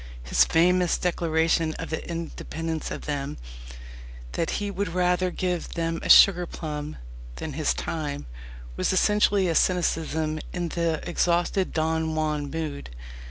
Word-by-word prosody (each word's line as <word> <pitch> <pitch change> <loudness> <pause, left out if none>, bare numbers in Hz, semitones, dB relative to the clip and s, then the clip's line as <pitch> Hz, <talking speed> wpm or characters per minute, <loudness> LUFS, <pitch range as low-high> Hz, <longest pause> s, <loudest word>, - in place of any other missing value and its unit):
His - - +4
famous 180 +1 +3
declaration 165 -2 +1
of 165 -1 -6
independence 165 -1 -4
of - - -6
them 145 -2 -3 0.9
that 165 - -1
he 205 -1 -3
would 200 0 -2
rather 180 0 +2
give 180 -1 -3
them 165 -1 -1
a - - -5
sugar 180 -3 +7
plum 150 -2 -5 0.4
than - - -5
his 60 - 0
time 145 - -4 0.5
was - - 0
essentially 200 0 +3
a 170 - +1
cynicism 160 -3 +1
in 175 -1 -2
the 165 -1 -1
exhausted 175 +2 +1
Don 160 0 0
Juan 150 -2 -1
mood. 155 - -5
165 Hz, 130 wpm, -26 LUFS, 155-180 Hz, 0.9 s, sugar